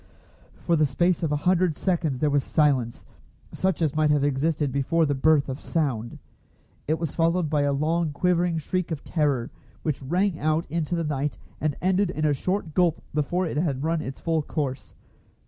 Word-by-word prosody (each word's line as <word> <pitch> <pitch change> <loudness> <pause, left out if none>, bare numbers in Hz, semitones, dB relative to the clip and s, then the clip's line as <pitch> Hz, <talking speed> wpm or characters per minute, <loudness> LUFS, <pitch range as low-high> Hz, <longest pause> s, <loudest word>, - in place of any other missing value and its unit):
For 170 - 0
the 155 -2 +3
space 175 +6 +1
of 160 -3 -1
a - - +2
hundred 180 -3 +3
seconds 165 -7 0
there 150 +2 +1
was 140 -1 +2
silence, 135 -7 +1 0.5
such 190 -3 0
as 150 -3 +1
might 155 -1 +3
have 145 -1 +3
existed 145 +1 0
before 140 +5 +1
the 145 - +1
birth 145 +1 +3
of 135 +1 -4
sound. 125 -8 -2 0.7
It 155 +2 +1
was 165 -3 -3
followed 165 -1 +1
by 150 -2 +2
a 145 0 +2
long 155 +3 0
quivering 175 +2 +1
shriek 180 +3 -2
of 160 -4 -4
terror, 145 -7 0 0.3
which 150 -3 -2
rang 175 +5 0
out 155 +2 +1
into 165 0 -1
the 170 - -1
night, 145 -2 -2 0.2
and 155 -2 0
ended 190 +1 +2
in 155 -3 -2
a 150 - +3
short 180 +3 -2
gulp 170 -1 +2
before 165 +5 0
it 155 - -3
had 145 -4 0
run 165 0 0
its 135 -2 -6
full 165 -2 0
course. 140 -3 -4
155 Hz, 190 wpm, -25 LUFS, 145-170 Hz, 0.7 s, the